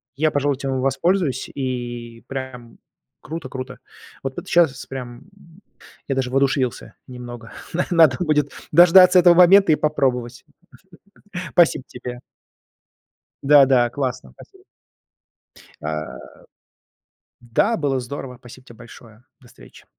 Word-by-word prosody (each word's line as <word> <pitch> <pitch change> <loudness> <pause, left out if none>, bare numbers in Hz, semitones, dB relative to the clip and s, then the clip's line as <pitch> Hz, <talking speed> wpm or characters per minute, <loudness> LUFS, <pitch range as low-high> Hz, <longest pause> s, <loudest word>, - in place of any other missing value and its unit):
Я, 155 +2 +1
пожалуй, 145 -1 0
этим 135 -1 -3
в - - -2
воспользуюсь. 140 +3 0
И 120 -3 -6
прям 130 -3 -8 0.4
круто, 160 -3 -7
круто. 130 0 -8 0.4
Вот 135 -1 -5
п - - -5
т - - -21
щас 160 -7 +2
прям 125 -1 -9 0.8
я 135 - -2
даже 130 -1 -2
воодушевился 135 -2 -1
немного. 120 -2 -10 0.2
На 180 - -1
надо 160 -6 +4
будет 150 -3 0 0.2
дождаться 180 +3 +7
этого 175 0 +6
момента 180 0 +6
и - - +5
попробовать. 125 -6 -2 1.1
Спасибо 165 -6 +3
тебе. 125 0 -9 1.2
Да, 140 0 +6
да, 125 -2 +2
классно. 125 - -5
Спасибо. - - -18 1.2
А, 75 0 -5 1.2
да, 120 - 0
было 140 -4 -1
здорово! 125 0 -8
Спасибо 125 +1 -15
тебе 120 -3 -16
большое. 115 -1 -16 0.2
До 125 - -20
встречи. - - -18
130 Hz, 125 wpm, -21 LUFS, 120-150 Hz, 1.2 s, дождаться